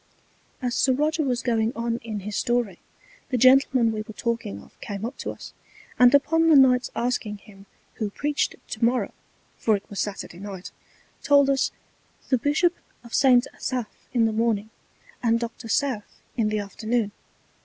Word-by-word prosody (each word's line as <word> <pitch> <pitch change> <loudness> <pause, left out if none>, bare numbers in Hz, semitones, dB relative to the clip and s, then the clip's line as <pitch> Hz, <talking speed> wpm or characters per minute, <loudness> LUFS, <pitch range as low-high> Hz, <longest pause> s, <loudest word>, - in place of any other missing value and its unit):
As 245 -1 0
Sir 260 - +3
Roger 305 +4 +1
was 255 -4 -1
going 225 -2 +1
on 230 0 -1
in 220 -3 -5
his 210 +2 -5
Story, 240 -7 0 0.5
the 255 - 0
Gentleman 255 -1 +5
we 215 -1 -3
were 215 0 -10
talking 230 - -3
of - - -22
came 205 +1 -5
up 250 +4 -5
to - - -4
us; - - -9 0.5
and 250 -1 +8
upon 325 +3 +3
the 315 - +7
Knight's 255 -2 +5
asking 235 -4 -1
him 200 -1 -17 0.3
who 215 -2 -2
preached 290 +7 -1
to - - -4
morrow 235 -3 +1 0.5
(for 220 - +3
it 200 - -7
was 200 - -5
Saturday 195 -4 -4
Night) 195 -2 -8 0.5
told 280 -1 +5
us, 270 0 +2 0.6
the 255 - +3
Bishop 310 +7 +2 0.3
of 235 - -13
St. 255 -3 +5
Asaph 250 -4 -3 0.2
in 235 -3 +3
the 220 - 0
Morning, 220 -1 0 0.5
and 230 -1 +2
Dr. 230 0 -6
South 240 -3 -1 0.2
in 225 -3 +1
the 215 - -1
Afternoon. 215 +2 -2
235 Hz, 170 wpm, -25 LUFS, 215-260 Hz, 0.6 s, and